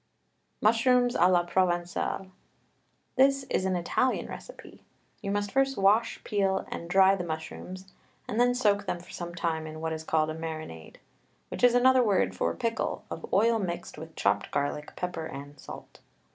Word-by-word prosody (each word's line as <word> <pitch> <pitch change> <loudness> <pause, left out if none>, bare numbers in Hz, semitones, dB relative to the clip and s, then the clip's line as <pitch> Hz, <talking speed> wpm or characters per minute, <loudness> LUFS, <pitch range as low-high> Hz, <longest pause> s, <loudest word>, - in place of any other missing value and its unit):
MUSHROOMS 245 +3 +4
A 175 - +4
LA 175 -1 +4
PROVENCALE. 175 +1 -1 0.9
This 275 +1 +4
is 185 - +1
an 190 -1 +1
Italian 180 +9 0
recipe. - - -11 0.4
You 200 - -4
must 205 0 -1
first 270 0 +1
wash, 200 +4 +3
peel, 195 -2 0
and 170 - -6
dry 190 +1 +6
the 185 - -4
mushrooms, 180 +3 -7 0.3
and 220 - -2
then 245 0 +4
soak 205 -4 +2
them 175 - -2
for 175 - -14
some 175 -1 -6
time 160 -2 -2
in 155 0 -8
what 160 0 -2
is 160 0 -5
called 155 -1 +1
a - - -6
marinade, 155 - -7 0.5
which - - -6
is 245 -1 +6
another 255 +1 +5
word 190 - +2
for 85 -2 -1
pickle, 230 0 -2
of - - -7
oil 225 +2 +3
mixed 175 -5 -5
with 160 0 -10
chopped 100 +1 +1
garlic, 145 +1 -3
pepper, 175 -3 -4
and 145 +1 -9
salt. - - -11
185 Hz, 170 wpm, -28 LUFS, 160-225 Hz, 0.9 s, dry